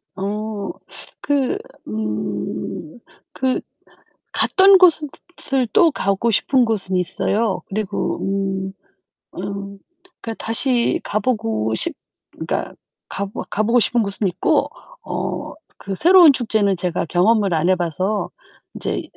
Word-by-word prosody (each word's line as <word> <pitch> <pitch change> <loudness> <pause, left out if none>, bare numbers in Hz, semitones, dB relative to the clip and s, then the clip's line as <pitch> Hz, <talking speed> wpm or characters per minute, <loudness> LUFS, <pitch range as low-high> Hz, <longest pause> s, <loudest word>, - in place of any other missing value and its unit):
어. 205 +1 -3 0.5
그 280 -3 +1 0.3
음. 105 - -4 0.3
그 260 -1 0 0.7
갔던 385 0 +6
곳은 330 -5 +4 0.5
을 255 -2 +3
또 335 - +5
가고 200 -3 0
싶은 250 +4 +3
곳은 205 -5 -2
있어요. 195 +4 0
그리고 210 0 -2
음 195 -1 -2 0.7
음, 200 0 -6 0.4
그니까 225 -1 -5
다시 240 +2 +1
가 210 - -1
보고 220 - -1
싶 - - 0 0.4
그니까 - - -4 0.4
가 200 - -3
보 200 - -6
가 215 - 0
보고 230 +3 +3
싶은 235 +2 +2
곳은 200 0 -2
있고. 180 - +1 0.4
어, - - -3 0.2
그 195 - -6
새로운 345 - +7
축제는 215 -6 +1
제가 175 0 -1
경험을 195 +3 +2
안 165 +2 +1
해 185 - +5
봐서 185 +4 -1 0.5
인제 - - -3
205 Hz, 205 characters per minute, -20 LUFS, 190-240 Hz, 0.7 s, 새로운